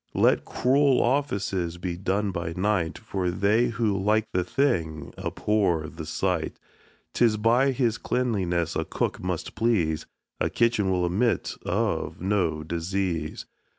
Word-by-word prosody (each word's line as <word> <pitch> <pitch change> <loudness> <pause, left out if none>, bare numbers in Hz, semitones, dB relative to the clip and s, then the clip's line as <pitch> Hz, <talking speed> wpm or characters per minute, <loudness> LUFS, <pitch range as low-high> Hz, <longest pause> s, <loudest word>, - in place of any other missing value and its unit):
Let - - +3
cruel 135 +1 +3
offices 100 -10 0
be 85 0 -3
done 100 +3 -1
by 85 -2 -3
night, 95 -4 0
For 95 -5 -2
they 100 +6 +2
who 115 -3 0
like 105 +3 +2
the 90 - +2
thing 85 - -1
abhor 95 -7 0
the 80 -2 -8
sight. 90 -1 -1 0.6
'Tis 115 -3 +3
by 120 +5 +3
his 120 -4 0
cleanliness 95 -9 0
a - - 0
cook - - -2
must - - -3
please; 90 -10 +1 0.3
A - - +1
kitchen 115 -4 +2
will 90 -1 +1
admit 110 +7 +1
of - - -1
no 90 -5 0
disease. 85 0 -2
95 Hz, 135 wpm, -26 LUFS, 85-115 Hz, 0.6 s, Let